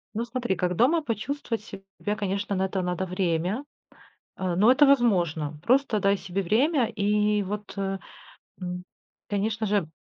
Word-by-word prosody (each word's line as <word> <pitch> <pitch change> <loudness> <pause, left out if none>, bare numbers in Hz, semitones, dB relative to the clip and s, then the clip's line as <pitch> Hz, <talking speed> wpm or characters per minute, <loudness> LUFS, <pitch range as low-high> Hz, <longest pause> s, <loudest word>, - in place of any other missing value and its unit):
Ну 230 +2 -1
смотри, 240 -3 -2
как 180 0 -1
дома 285 - +4
почувствовать 235 -2 -3
себя, 195 0 -6
конечно, 200 0 -2
на 190 0 +1
это 190 0 -2
надо 180 +1 -1
время, 180 - -1 0.7
а, 185 -2 -2
но 210 +7 +6
это 290 +3 +6
возможно. 175 - +2
Просто 250 -2 +3
дай 200 +1 +3
себе 195 0 -3
время 255 - +3
и 210 0 +1
вот, 205 +1 -5
э, 195 0 -1 0.6
ну, 180 -1 -4 0.5
конечно 215 +2 -1
же, 200 -6 +1
200 Hz, 150 wpm, -26 LUFS, 185-230 Hz, 0.7 s, но